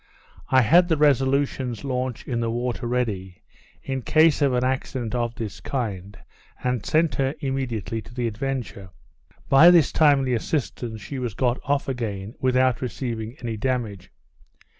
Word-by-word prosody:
I 130 -1 +5
had 175 +10 +5
the 160 -3 +1
Resolution's 135 -4 +1
launch 130 -3 -3
in 120 -3 -1
the 115 -1 -1
water 120 +1 -2
ready, 105 -7 -3 0.4
in 135 -1 -3
case 155 +4 +4
of 140 -2 +3
an 125 0 +1
accident 130 -3 -2
of 120 -1 -1
this 105 -4 -6
kind, 105 -7 -4 0.5
and 125 -3 -1
sent 160 0 +2
her 135 +2 0
immediately 125 - -3
to 120 - -14
the 125 -1 -1
Adventure. 115 -4 -4 0.6
By 145 +6 +8
this 170 -4 +5
timely 140 -4 +3
assistance, 120 -3 -3
she 135 +6 -6
was 120 -5 -4
got 125 +3 0
off 145 0 0
again, 110 -5 -4
without 130 -1 +2
receiving 120 -2 -4
any 115 -2 -3
damage. 110 -6 -3
125 Hz, 150 wpm, -24 LUFS, 115-135 Hz, 0.6 s, By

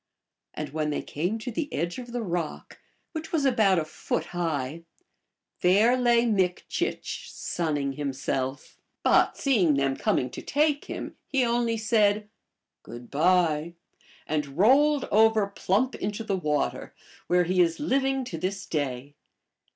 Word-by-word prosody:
And 150 -2 -4
when 155 +1 -2
they 150 - -2
came 175 +9 -2
to 235 +3 -5
the 290 +5 -3
edge 170 +8 -2
of 245 -1 -9
the 240 -1 -3
rock, 175 -5 -4 0.3
which 320 0 -6
was 310 -4 +1
about 220 -8 +4
a 160 - 0
foot 155 +1 -3
high, 160 -3 -2 0.8
there 205 +7 +4
lay 240 -1 +3
Mik 190 -6 +1
chich - - -3
sunning 145 -5 -2
himself; 135 -1 -3 0.2
but - - +4
seeing 195 - +3
them 135 -1 +1
coming 125 -1 0
to - - -7
take 295 0 +1
him, - - -6
he 265 -3 +1
only 235 -1 +1
said, 215 -2 +2 0.3
" - - -60
Good 120 0 -11
by," 170 +1 +2 0.5
and 145 -2 -3
rolled 275 +7 +4
over 220 0 +5
plump 200 +5 0
into 205 +3 -4
the 200 -3 -1
water, 150 -5 -2 0.3
where 180 0 +3
he 180 +1 +2
is 165 -1 +1
living 270 -2 +1
to 165 -9 -6
this 195 +3 -3
day. 140 -2 -3
185 Hz, 150 wpm, -26 LUFS, 155-235 Hz, 0.8 s, over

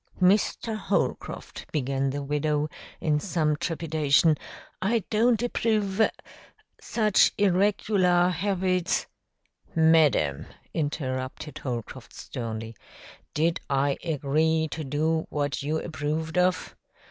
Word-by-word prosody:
"Mr. 205 +4 +2
Holcroft," 215 - -3
began 135 -2 0
the 140 +1 -3
widow, 150 +1 0 0.3
in 150 -2 +1
some 155 -3 0
trepidation, 155 -1 +2 0.5
"I 220 +2 +1
don't 230 +1 +3
approve 215 -4 0 0.8
such 215 -3 +3
irregular 190 -2 +3
habits 185 0 0 0.4
" - - -35 0.2
"Madam," 135 - +3 0.3
interrupted 145 -1 -3
Holcroft 120 -4 -6
sternly, 115 -1 -6 0.6
"did 165 +2 +1
I 140 0 +1
agree 160 +1 +1
to 160 - -4
do 155 +3 0
what 145 -1 -2
you 150 +3 -1
approved 160 +2 -3
of? 180 0 +1
160 Hz, 100 wpm, -26 LUFS, 145-185 Hz, 0.8 s, don't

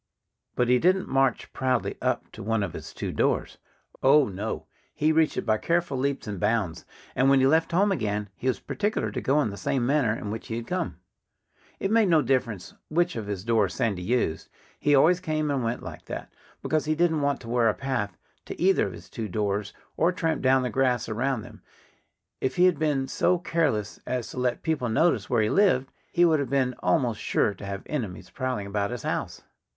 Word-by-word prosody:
But 125 - +2
he 125 0 +4
didn't 185 +4 +2
march 135 -2 +1
proudly 130 -2 0
up - - -1
to - - -10
one 110 0 0
of 90 - -4
his - - -8
two - - -4
doors. - - 0 0.4
Oh, 140 +1 +5
no! 100 +3 -4 0.3
He 155 +1 +2
reached 160 0 +2
it - - -2
by 110 -2 +2
careful 170 -4 0
leaps 140 +1 -1
and 105 -4 -5
bounds. 105 -7 0 0.3
And 130 +1 +4
when 135 -1 +5
he 130 - +4
left 160 +4 +3
home 195 +4 +3
again 105 - -1
he 130 - -5
was 130 - +1
particular 210 +1 -2
to - - -3
go 140 +3 +2
in 110 - -2
the 100 - -8
same 120 +5 0
manner 130 -5 +2
in 105 - -5
which 110 - -6
he 110 - -3
had 115 0 -4
come. 180 +7 -3 0.8
It 195 - -1
made 220 -3 +4
no 160 -3 +4
difference 120 -7 -1 0.2
which 175 +3 +1
of 110 -3 -4
his 100 -3 -4
doors 110 -4 +1
Sandy 100 -6 0
used. 100 -5 -1 0.3
He 145 -1 +3
always 165 +6 +5
came 155 -3 -1
and 135 -3 0
went 115 +1 -2
like - - -9
that, - - -7 0.3
because 155 -1 0
he 155 0 +1
didn't 160 -2 +2
want 140 -1 +1
to 120 - -11
wear 120 -1 +3
a 105 - 0
path 130 -7 -3 0.3
to - - -8
either 185 - +3
of 95 - -7
his 85 +1 -11
two 110 +3 -5
doors 100 0 -1 0.3
or 170 +3 +3
tramp 165 -3 -1
down 130 0 +4
the 125 - -2
grass 125 -2 +1
around 120 +1 -1
them. - - -13 0.8
If 130 - -1
he 180 0 +5
had 180 -5 +3
been 145 -4 +1
so 180 +5 +2
careless 155 - -1
as 125 -2 -2
to - - -10
let 125 -1 -1
people 150 -7 0
notice 110 - +2
where 120 -3 +3
he 105 - 0
lived 180 -10 +3 0.2
he 175 - +4
would 160 -3 +4
have 140 -3 -2
been 130 -2 +1
almost 110 +5 +1
sure 105 - +1
to 100 - -10
have 100 0 -5
enemies 110 -12 -5
prowling 130 -6 -3
about 100 0 -1
his 120 -2 -5
house. - - -3
130 Hz, 215 wpm, -26 LUFS, 110-155 Hz, 0.8 s, Oh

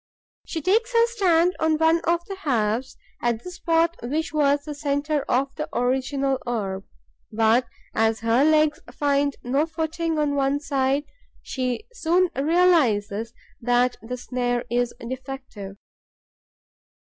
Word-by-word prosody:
She 320 -3 -4
takes 450 +7 +2
her 465 0 +5
stand 360 -6 +2
on 315 -1 +2
one 325 +1 +3
of 340 0 +1
the 390 - -7
halves, 245 - -1 0.2
at 235 -1 0
the 360 - -7
spot 335 -1 +1
which 300 +6 -2
was 285 -1 +2
the 300 - -6
centre 290 0 -1
of 270 +2 +1
the 305 - -4
original 265 +2 0
orb; 195 -5 -3 0.5
but, 225 +3 +3 0.3
as 225 0 +1
her 230 +4 +3
legs 310 0 +3
find 285 -1 +1
no 275 +6 +1
footing 325 0 -2
on 295 -1 +1
one 280 0 +1
side, 275 -1 0 0.4
she 255 - -3
soon 360 -5 +2
realizes 255 - +2 0.3
that 245 +1 +2
the 250 +3 -5
snare 245 -1 -2
is 245 0 +1 0.2
defective. 260 -6 -7
280 Hz, 135 wpm, -24 LUFS, 245-320 Hz, 0.5 s, her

